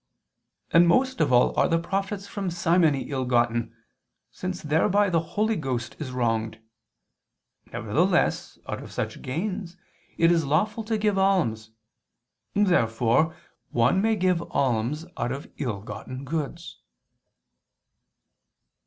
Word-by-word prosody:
And 170 Hz, +1 st, +6 dB
most 260 Hz, +9 st, +2 dB
of -, -, +2 dB
all 125 Hz, 0 st, +4 dB
are -, -, +4 dB
the 165 Hz, -, +2 dB
profits 195 Hz, +3 st, -3 dB
from 195 Hz, -1 st, -4 dB
simony 165 Hz, -4 st, +2 dB
ill 130 Hz, -2 st, -1 dB
gotten, 120 Hz, -2 st, +1 dB, 0.6 s
since 185 Hz, -1 st, -5 dB
thereby 190 Hz, +6 st, +2 dB
the 165 Hz, -, +3 dB, 0.2 s
Holy 220 Hz, +1 st, +2 dB
Ghost 130 Hz, -, -3 dB
is 145 Hz, -5 st, -5 dB
wronged. 115 Hz, -3 st, -1 dB, 1.1 s
Nevertheless -, -, 0 dB
out -, -, -4 dB
of -, -, -10 dB
such -, -, -4 dB
gains 185 Hz, +5 st, -4 dB, 0.4 s
it 165 Hz, 0 st, +5 dB
is 165 Hz, -1 st, +3 dB
lawful 205 Hz, +10 st, 0 dB
to 220 Hz, 0 st, 0 dB
give 210 Hz, -2 st, +1 dB
alms. 155 Hz, -, +1 dB, 0.9 s
Therefore 155 Hz, -, +2 dB, 0.3 s
one 125 Hz, +11 st, +2 dB
may 220 Hz, +1 st, +2 dB
give 185 Hz, -3 st, +1 dB
alms 130 Hz, +5 st, 0 dB
out 120 Hz, +1 st, -1 dB
of 135 Hz, +2 st, -6 dB
ill 115 Hz, -8 st, -3 dB
gotten 130 Hz, +5 st, -7 dB
goods. 160 Hz, +3 st, -5 dB
165 Hz, 125 wpm, -25 LUFS, 125-195 Hz, 1.1 s, And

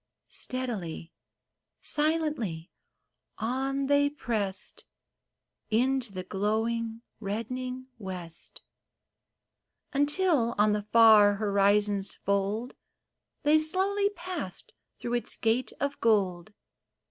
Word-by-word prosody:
Steadily, 205 Hz, -11 st, -4 dB, 0.7 s
silently, 295 Hz, -, 0 dB, 0.7 s
on 270 Hz, +4 st, -1 dB
they 285 Hz, +1 st, +3 dB
pressed 220 Hz, -9 st, -4 dB, 0.8 s
Into 250 Hz, +1 st, +1 dB
the 185 Hz, -1 st, -5 dB
glowing, 225 Hz, +4 st, -1 dB, 0.2 s
reddening 250 Hz, +5 st, -4 dB
west; 180 Hz, -4 st, -8 dB, 1.3 s
Until, 290 Hz, -4 st, +2 dB
on 210 Hz, +1 st, +4 dB
the 210 Hz, 0 st, +1 dB
far 215 Hz, -1 st, +6 dB
horizon's 200 Hz, -1 st, +2 dB
fold, 200 Hz, +5 st, -1 dB, 0.7 s
They 300 Hz, +1 st, +5 dB
slowly 390 Hz, +6 st, +2 dB
passed 345 Hz, -, -5 dB, 0.3 s
through 240 Hz, -, -4 dB
its 240 Hz, -, -1 dB
gate 235 Hz, +3 st, 0 dB
of 280 Hz, +1 st, -2 dB
gold. 195 Hz, -4 st, +1 dB
230 Hz, 85 wpm, -29 LUFS, 200-275 Hz, 1.3 s, far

